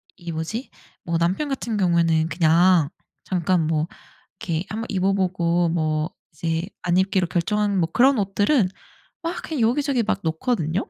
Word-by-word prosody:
이 170 -2 -7
뭐지 165 - -4 0.3
뭐 170 -1 -1
남편 185 - 0
같은 240 -4 -3
경우에는 170 -4 +2
그냥 170 -1 +4 0.4
잠깐 180 -2 +1
뭐 155 0 0 0.5
이렇게 165 0 -2
1 220 +2 -3
번 230 - -4
입어보고 185 -3 +1
뭐 155 -1 0 0.2
이제 165 +2 -2 0.2
안 175 0 0
입기로 190 -1 +2
결정하는 200 +3 0
그런 265 +1 +4
옷들은 205 +3 +2 0.5
막 335 +1 -3
그냥 310 -6 -3
여기저기 250 +1 +2
막 205 - 0
놓거든요. 165 - -1
180 Hz, 290 characters per minute, -23 LUFS, 165-210 Hz, 0.5 s, 그냥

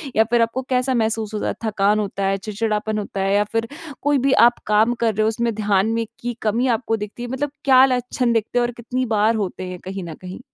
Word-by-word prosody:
या 220 - +5
फिर 240 -1 +3
आपको 230 +3 0
कैसा 255 +1 +1
महसूस 220 -1 -1
होता 210 - -2
है, - - -1
थकान 210 0 +2
होता 200 -1 -2
है, 195 0 +1
चिड़चिड़ापन 215 +1 -2
होता 200 -1 -5
है? 195 +1 +1
या 205 - +4
फिर 225 0 -1 0.3
कोई 290 0 +2
भी 270 - +4
आप 240 - -1
काम 215 +3 +3
कर 230 -2 0
रहे 215 - +1
हो 215 - +3
उसमें 230 +1 0
ध्यान 205 -1 +1
में 230 0 -1
की 240 0 -3
कमी 230 +4 +1
आपको 225 -1 0
दिखती 210 +3 -7
है? 245 - -5
मतलब 270 +2 -2
क्या 260 -2 +6
लक्षण 250 -1 0
दिखते 225 +2 0
हैं 240 - +2
और 240 - -3
कितनी 250 +2 -2
बार 215 +2 +3
होते 190 -3 -3
हैं 180 -1 -7
कहीं 190 0 -5
न 165 -2 -7
कहीं? 185 +3 -8
225 Hz, 245 wpm, -21 LUFS, 210-240 Hz, 0.3 s, क्या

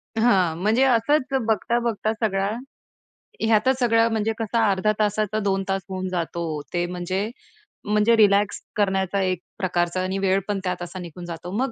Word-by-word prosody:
हां, 195 -8 +3
म्हणजे 220 +6 +3
असंच 270 +3 +2
बघता-बघता 230 0 0
सगळा 200 -3 0 0.9
ह्यातच 225 +4 +3
सगळं 230 -1 +4
म्हणजे 220 0 0
कसं 225 +1 -1
अर्ध्या 205 0 +2
तासाचा 215 0 0
2 195 -1 0
तास 195 0 0
होऊन 185 0 -3
जातो. 170 -3 -3
ते 175 0 +1
म्हणजे 185 +4 -2 0.6
म्हणजे 210 +2 +3
रिलॅक्स 205 -1 +3
करण्याचा 195 -1 +1
एक 185 -2 0 0.2
प्रकारचा 175 -1 0
आणि 190 +1 -2
वेळ 195 0 +2
पण 205 -2 -1
त्यात 180 -1 -2
असा 175 +2 -7
निघून 175 0 -8
जातो. 175 +1 -7
मग 265 0 0
200 Hz, 155 wpm, -23 LUFS, 185-220 Hz, 0.9 s, सगळं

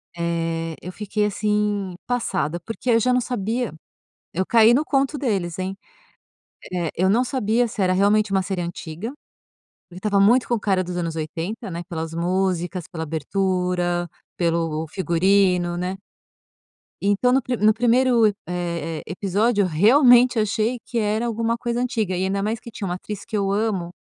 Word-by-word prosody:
eh, 165 -1 -2
eu 180 - -7
fiquei 210 +1 -2
assim, 210 -2 -1
passada, 190 -9 -1
porque 225 +6 -6
aí 230 - +5
eu - - +5
já 250 +2 +2
não 250 - +3
sabia 235 -1 -2 0.6
eu 190 - +1
caí 230 0 +6
no 285 - +3
conto 275 0 0
deles, 195 -10 -1
hein. 190 +1 -3 0.9
Eh, 175 -3 -2
eu 185 +2 +2
não 235 +6 +3
sabia 245 -2 +1
se 220 -2 -6
era 185 -1 +3
realmente 205 +2 +3
uma 190 -1 +2
série 185 -1 -3
antiga, 170 +4 -5 0.8
porque 180 - -13
estava 200 -1 +1
muito 240 +6 +4
com 240 - +1
o - - -3
cara 190 -2 +1
dos 180 0 -5
anos 165 -2 -2
80, 165 +7 -4
né, 170 0 -5
pelas 165 -2 -5
músicas, 180 0 -1
pela 160 -2 -4
abertura, 175 +2 -1 0.3
pelo 165 -2 -1
figurino, 180 +1 +2
né. 185 +2 -3 1.0
Então 205 +5 +2
no 265 +1 +3
pri 245 +1 -2
no 215 +1 +4
1º 240 0 +3
e 205 - +1
eh 170 -2 -3
eh, - - -16
episódio, 200 +4 +1
eu - - +1
realmente 245 - +5
achei 220 +3 0
que 240 - -5
era 220 +2 0
alguma 230 0 0
coisa 235 0 -2
antiga, 225 -7 -1
e 185 - 0
ainda 195 +1 0
mais 220 +2 -1
que 235 - -11
tinha 200 -3 -5
uma 175 - -2
atriz 200 +2 -7
que 220 -2 -3
eu 195 -1 0
amo, 200 -5 -1
195 Hz, 175 wpm, -22 LUFS, 175-225 Hz, 1.0 s, caí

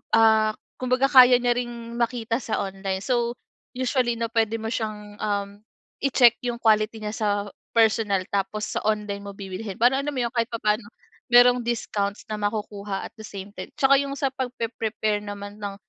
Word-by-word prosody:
ah, 220 -1 +5 0.3
kumbaga 255 +1 +2
kaya 255 -2 +9
niya 245 - +2
ring 235 -1 -5
makita 235 0 0
sa 220 - -2
online. 195 -1 -4
So 240 0 0 0.4
usually 250 -1 +1
'no, 230 0 -3
puwede 225 -1 +1
mo 225 - -3
siyang, 210 -2 -4
um, 200 -1 -1 0.5
i-check 245 -3 +5
yung 240 -1 -2
quality 215 0 +3
niya 210 - -3
sa 215 -1 -1 0.5
personal 215 -4 +3
tapos 200 +2 -2
sa - - +2
online 210 -2 -1
mo 200 - -7
bibilhin 195 +1 -6
para 245 +3 +4
alam 295 +1 -3
mo 260 - -3
yun 235 - 0
kahit 230 -2 +1
papano 215 -1 0 0.5
mayrong 245 +1 +7
discounts 205 -4 -2
na 215 - -3
makukuha 205 -1 -3
at - - -21
the 220 - -7
same 200 -1 -8
time. - - -6
'Tsaka 275 0 +5
yung 275 0 -4
sa 275 -1 -1
pagpepre-prepare 230 -4 -2
naman 205 0 -7
ng, 200 -1 -5
220 Hz, 175 wpm, -24 LUFS, 205-240 Hz, 0.5 s, kaya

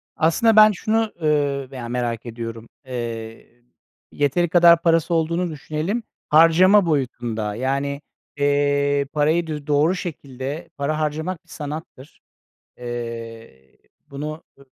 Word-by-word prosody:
Aslında 190 +8 +3
ben 215 0 +8
şunu, 220 +2 0
ııı, 145 -3 +1
veya 125 -3 -6
merak 120 -2 -2
ediyorum. 115 -1 -7 0.2
Eee, 115 -1 -7 0.5
yeteri 145 +4 +1
kadar 170 -1 +6
parası 165 0 +2
olduğunu 170 +2 0
düşünelim 155 +9 -3 0.3
harcama 175 +6 +6
boyutunda 120 -8 -2
yani, 140 +3 -2 0.4
eee, 145 0 +2
parayı 155 +3 +1
dü 150 -2 -6
doğru 150 +5 +3
şekilde 145 -2 -6
para 150 +2 -1
harcamak 155 +3 -3
bir - - -30
sanattır. 150 -2 -8 0.6
Eee, 115 - -8 0.3
bunu, 150 +3 -6 0.2
ı 140 - -17
145 Hz, 115 wpm, -22 LUFS, 125-165 Hz, 0.6 s, ben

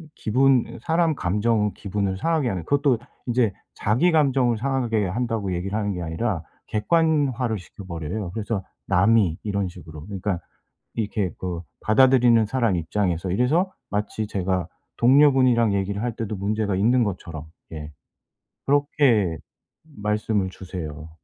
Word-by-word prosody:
기분 130 +1 +2
사람 165 -1 +1
감정 105 +3 +1
기분을 100 -1 -2
상하게 160 0 +1
하는 90 -5 -3
그것도 140 - +2 0.3
인제 120 -3 +2 0.2
"자기감정을 135 -1 +2
상하게 120 -4 0
한다."고 110 -2 -2
얘기를 95 +4 -2
하는 105 -1 -1
게 90 - -5
아니라 85 +2 -2 0.3
객관화를 130 - +1
시켜버려요. 90 +1 -6
그래서 105 -2 -3 0.2
"남이." 95 -2 +3
이런 100 -2 -1
식으로. 80 -4 -10
그러니까 95 -2 -3 0.6
이렇게 105 -4 -1
그 90 -2 -4 0.2
받아들이는 120 -1 +5
사람 115 -4 +1
입장에서 90 +1 -1
이래서 150 - +2 0.2
마치 105 +1 -2
제가 95 -3 -1 0.3
동료분이랑 130 -4 +5
얘기를 100 +2 -1
할 120 -3 -2
때도 110 -2 -3
문제가 100 0 -1
있는 120 +5 +3
것처럼 85 -6 -5 0.3
예 75 -1 -7 0.8
그렇게 135 - +3 0.6
말씀을 105 -2 0
주세요. 80 -5 -7
105 Hz, 320 characters per minute, -24 LUFS, 95-125 Hz, 0.8 s, 받아들이는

